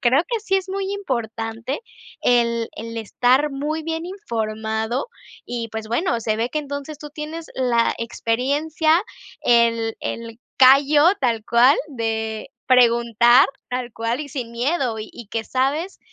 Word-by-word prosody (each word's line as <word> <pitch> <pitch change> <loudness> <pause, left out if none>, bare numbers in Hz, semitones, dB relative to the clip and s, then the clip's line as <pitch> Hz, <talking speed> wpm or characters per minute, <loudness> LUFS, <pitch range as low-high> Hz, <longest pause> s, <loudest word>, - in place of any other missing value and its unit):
creo 260 +5 +4
que 465 -3 -1
sí 390 -2 +1
es 380 0 -3
muy 390 +1 -2
importante 235 - -3 0.4
el 235 -1 +2
el 230 +1 -7
estar 250 +6 +2
muy 300 +3 -3
bien 325 0 -3
informado. 220 - -3 0.4
Y, 235 -1 -4
pues, 220 0 -6
bueno, 235 - 0
se 215 -1 0
ve 230 +2 0
que 305 - -1
entonces, 285 0 -6
tú 295 -1 -9
tienes 315 +2 -6
la 245 -3 +2
experiencia, 285 +8 +1 0.4
el 230 -1 +3
el 230 -1 -5 0.2
callo, 280 +3 +6 0.2
tal 230 -4 0
cual, 245 +4 +5
de 220 -4 -3 0.2
preguntar 235 0 +5 0.3
tal 250 -2 -3
cual 230 +4 -2
y 285 - -9
sin 245 -5 -5
miedo, 250 -2 -1
y 215 - -7
y 235 - -10
que 225 -1 -3
sabes 285 - -1
245 Hz, 145 wpm, -22 LUFS, 230-295 Hz, 0.4 s, callo